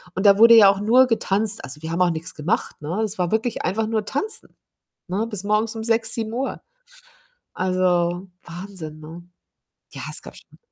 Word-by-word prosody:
und 190 - -2
da 200 -1 +7
wurde 230 +1 +8
ja 205 -3 +8
auch 195 - +1
nur 245 +5 +5
getanzt. 215 -2 +1
Also, 150 +3 -7
wir 160 0 -5
haben 170 - -1
auch 180 - +4
nix 165 +3 -5
gemacht, 175 - -2
ne? 170 +8 -3
Das 215 -2 -3
war 175 -2 -1
wirklich 225 +1 -1
einfach 215 +4 -1
nur 220 -2 -1
tanzen, 415 - -4 0.5
ne, 200 +5 -1
bis 205 -3 -5
morgens 215 +2 0
um 220 - -5
6:00, 225 0 +1
7:00. 230 +4 -3 0.9
Also, 180 0 0 0.2
Wahnsinn, 170 -3 -9
ne? 165 +3 -11 0.7
Ja, - - -9
es - - -1
gab - - -12
schon - - -16
200 Hz, 185 wpm, -22 LUFS, 175-225 Hz, 0.9 s, wurde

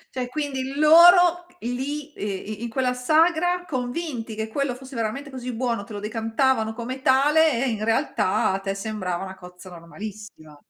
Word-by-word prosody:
Cioè 250 -1 -3
quindi 270 -1 -3
loro 345 +3 +6
lì, 275 +5 -4
uhm, - - -7
i 205 +2 -5
in 235 - -4
quella 250 +2 0
sagra, 330 +7 +2
convinti 250 -4 -4
che 220 0 -3
quello 270 +2 -2
fosse 265 +1 -12
veramente 265 +6 -3
così 250 -1 -5
buono, 235 -3 -2
te 210 - -11
lo 205 - -5
decantavano 225 +2 0
come 255 +3 -6
tale 275 0 +3
e - - 0
in 215 -2 -3
realtà 225 -5 +1
a 190 - -1
te 195 0 -3
sembrava 195 -3 -4
una 190 - -7
cozza 180 0 -13
normalissima. 175 -2 -10
250 Hz, 170 wpm, -24 LUFS, 215-285 Hz, -, loro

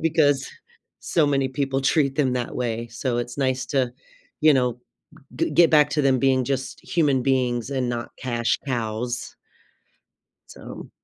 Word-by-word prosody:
because 145 -4 +2 0.5
so 160 - +1
many 135 -1 +1
people 135 0 -1
treat 135 0 +1
them 135 -4 +2
that 125 -2 -3
way. 120 -1 -2
So 120 +1 -2
it's 120 +2 -5
nice 130 -2 0
to, 130 -3 0 0.5
you 155 0 +6
know, 125 -3 0 0.6
g - - 0
get 170 -2 +5
back 150 -1 +5
to 150 +1 +1
them 135 -2 +3
being 130 -1 +3
just 135 -1 -3
human 140 -7 +1
beings 125 -3 0
and 130 -3 -1
not 120 -1 -4
cash 120 -2 0
cows 120 -1 -3 1.1
so - - -10
130 Hz, 150 wpm, -23 LUFS, 120-140 Hz, 1.1 s, you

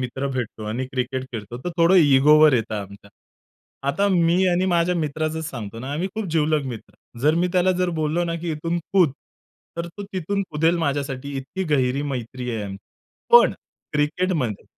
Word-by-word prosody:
मित्र 130 +2 -3
भेटतो 120 -4 -4
आणि 120 +5 -3
क्रिकेट 130 0 -3
खेळतो, 115 +1 -6
तर 180 - -2
थोडं 170 +2 +4
इगोवर 150 -2 +6
येत 115 -3 0
आमच्या. 100 -1 -7 0.8
आता 200 +9 +1
मी 180 0 +3
आणि 180 +1 +2
माझ्या 175 -1 +2
मित्राचच 155 0 -2
सांगतो 115 -3 -7
ना, 130 +4 -5
आम्ही 175 +6 -2
खूप 220 -2 -3
जीवलग 155 -2 +1
मित्र. 120 -4 -8 0.3
जर 150 +4 +3
मी 175 +2 +1
त्याला 185 0 +3
जर 180 -1 +1
बोललो 155 +3 0
ना, 165 0 -2
की 170 0 -4
इथून 165 +3 -2
कूद 175 -8 +4 0.6
तर 170 0 -3
तो 200 +4 -9
तिथून 195 +2 -1
कुदेल 160 +3 +2
माझ्यासाठी 140 -2 -2
इतकी 135 +8 -4
गहिरी 130 +1 +1
मैत्री 125 -2 -4
आहे 110 -3 -3
आमची. 100 -1 -6 0.5
पण 480 - +8 0.4
क्रिकेटमध्ये 150 - -1
150 Hz, 170 wpm, -23 LUFS, 130-170 Hz, 0.8 s, पण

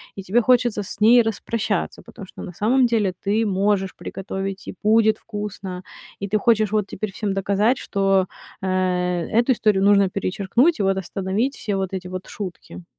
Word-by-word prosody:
и 195 - -6
тебе 210 +6 +2
хочется 240 -2 +2
с 200 - -9
ней 235 +3 +7
распрощаться, 220 -2 -2
потому 200 -4 -11
что - - -11
на 180 - -8
самом 245 +8 +3
деле 215 -5 +1
ты 215 +3 +2
можешь 195 -1 0
приготовить 195 0 -6
и - - -6
будет 220 0 +4
вкусно, 205 -4 -6 0.4
и 200 - -3
ты 210 +2 +1
хочешь 215 -1 +2
вот 210 -2 +1
теперь 200 +1 -5
всем 200 0 -2
доказать, 200 +5 +1
что, 195 -3 +1 0.3
э, 190 - -3 0.7
эту 240 +3 +3
историю 210 -4 +2
нужно 200 -1 +5
перечеркнуть 200 - +1
и - - +1
вот 195 0 +2
остановить 195 +8 -2
все 205 - -3
вот 190 -1 -3
эти 185 -1 -4
вот 185 0 -7
шутки. 175 - -8
200 Hz, 175 wpm, -22 LUFS, 190-220 Hz, 0.7 s, ней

